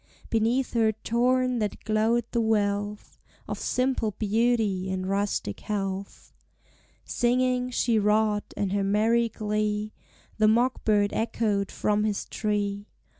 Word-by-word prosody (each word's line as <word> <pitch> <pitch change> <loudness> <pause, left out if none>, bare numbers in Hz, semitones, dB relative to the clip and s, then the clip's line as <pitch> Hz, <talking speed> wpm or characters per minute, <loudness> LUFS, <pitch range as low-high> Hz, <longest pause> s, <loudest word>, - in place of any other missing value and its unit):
Beneath 230 +4 +1
her 225 -2 +3
torn 245 +3 +1
hat 210 - -3
glowed 220 +2 +1
the 235 - +1
wealth 205 -1 -1 0.3
Of - - -4
simple 250 -5 0
beauty 215 -3 +1
and 185 0 -2
rustic 195 - -1
health. 195 -2 -5 0.7
Singing, 250 +1 +1
she 235 -2 +1
wrought, 210 0 +1
and 200 -2 -1
her 200 -1 +1
merry 225 +4 +2
glee 210 0 -2 0.5
The 215 - +5
mock 240 +4 +2
bird 205 -2 +2
echoed 215 -3 0
from 210 0 0
his 210 -2 -1
tree. 205 -1 -2
215 Hz, 125 wpm, -26 LUFS, 205-235 Hz, 0.7 s, The